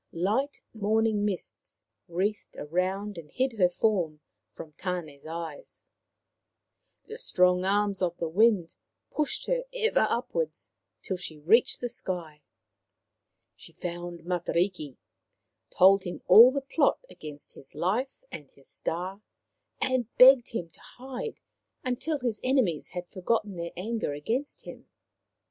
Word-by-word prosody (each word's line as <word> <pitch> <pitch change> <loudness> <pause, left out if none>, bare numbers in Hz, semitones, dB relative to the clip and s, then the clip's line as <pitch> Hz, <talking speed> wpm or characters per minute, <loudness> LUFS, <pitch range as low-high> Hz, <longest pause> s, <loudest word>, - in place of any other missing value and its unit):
Light 220 +12 -1
morning 220 0 +1
mists 185 - -6 0.2
wreathed 195 +5 -2
round 190 +2 -1
and 155 -2 -12
hid 255 - -1
her 180 -2 +5
form 175 -6 0 0.3
from 155 - -10
Tane's 160 -5 -5
eyes; 165 -2 -7 1.2
the 445 +2 -7
strong 180 - +3
arms 200 0 +1
of 175 -1 0
the 170 - -2
Wind 195 0 +3 0.4
pushed 300 -2 +1
her - - 0
ever 470 -2 +2
upward - - -1 0.5
till 190 - -2
she 165 -3 -4
reached 195 +11 +3
the 245 - -1
sky. 170 -9 -4 1.1
She - - -9
found 175 -1 -6
Matariki, 175 -4 -1 0.7
told 195 +2 +6
him 175 - -6
all 235 +4 +9
the 280 +1 -2
plot 285 - +1
against 150 - -9
his 135 - -11
life 245 - -1
and 145 - -8
his 140 - -18
star, 185 +4 -4 0.6
and 255 -3 0
begged 255 -1 +8
him 175 -7 -4
to - - -16 0.2
hide 260 - -6 0.4
until 255 +5 -1
his 240 -5 -2
enemies 255 - +1
had 180 -1 -6
forgotten 205 +2 -1
their 170 0 -5
anger 220 -4 -2
against 230 - -3
him. - - -11
190 Hz, 130 wpm, -28 LUFS, 170-240 Hz, 1.2 s, all